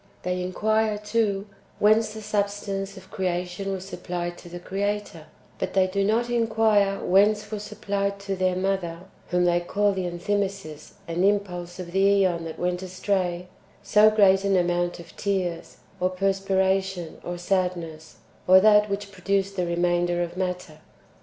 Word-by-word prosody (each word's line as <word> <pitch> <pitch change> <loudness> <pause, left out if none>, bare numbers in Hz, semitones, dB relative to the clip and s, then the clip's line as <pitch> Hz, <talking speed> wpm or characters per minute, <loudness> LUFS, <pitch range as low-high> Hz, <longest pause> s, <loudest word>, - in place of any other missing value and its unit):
They 180 0 -1
inquire, 215 +4 0
too, 210 -2 0 0.3
whence 215 +1 +3
the 220 - -7
substance 200 -1 -2
of 190 0 -14
creation 180 +1 -2
was 190 -1 -4
supplied 175 -2 -4
to 175 - -12
the 175 - -7
Creator; 200 -3 -3 0.3
but - - -3
they 190 -1 +5
do 195 +1 -1
not 225 +4 +1
inquire 220 -4 +2
whence 210 +3 +3
[were 215 - -3
supplied] 200 -1 -3
to 195 -1 -3
their 185 -1 +1
Mother 185 -3 -2 0.3
(whom 180 0 +2
they 175 0 +3
call 205 +4 +1
the 190 -2 -2
Enthymesis 190 -3 -3
and 170 +2 -1
impulse 180 -3 0
of 180 -2 -7
the 195 +1 +4
^on 170 -3 0
that 160 - -7
went 180 0 -1
astray) 185 -1 -2 0.4
so 210 +1 +6
great 200 -3 +4
an 195 -1 +2
amount 175 0 0
of 170 -1 -13
tears, 185 -5 -2 0.2
or 185 - +2
perspiration, 190 -1 0
or 175 0 -4
sad 180 0 0
ness, 160 -2 -9 0.3
or 185 +1 +8
that 210 +1 +5
which 200 0 -4
produced 195 +1 -1
the 180 -2 -1
remainder 175 0 +1
of 170 0 -6
matter. 180 -4 -4
190 Hz, 160 wpm, -25 LUFS, 175-200 Hz, 0.4 s, or